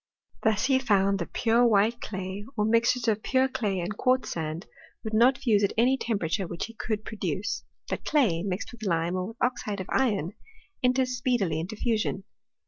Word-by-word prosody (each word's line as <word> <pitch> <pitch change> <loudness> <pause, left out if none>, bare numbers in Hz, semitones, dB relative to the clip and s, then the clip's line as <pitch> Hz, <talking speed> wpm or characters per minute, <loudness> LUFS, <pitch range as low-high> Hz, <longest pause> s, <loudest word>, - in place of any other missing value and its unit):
Thus 220 +1 +2
he 265 -1 +3
foimd 200 -5 +2
that 170 - -5
pure 235 +1 +3
white 225 +1 +3
clay, 190 0 -5
or 210 - +2
mixtures 230 +2 +2
of 215 -1 +2
pure 260 +3 +2
clay 210 -7 -2
and 180 +4 -3
quartz 255 -1 +1
sand, 160 +2 -4 0.4
would 220 - -5
not 245 +4 +5
fuse 210 -5 +2
at 200 - +1
any 250 +4 +4
temperature 195 -7 -1
which 170 - -4
he 230 - -11
could 215 -1 -3
produce; 195 -3 -3 0.2
but - - -4
clay, 225 - +2
mixed 190 +1 -3
with 240 -2 -14
lime 170 -3 0
or 185 0 -1
with 225 +2 -10
oxide 215 -5 -1
of 190 - -4
iron, 205 - +1 0.5
enters 255 0 +2
speedily 230 -11 0
into 180 +7 -5
fusion. 220 -3 -1
215 Hz, 185 wpm, -27 LUFS, 190-240 Hz, 0.5 s, not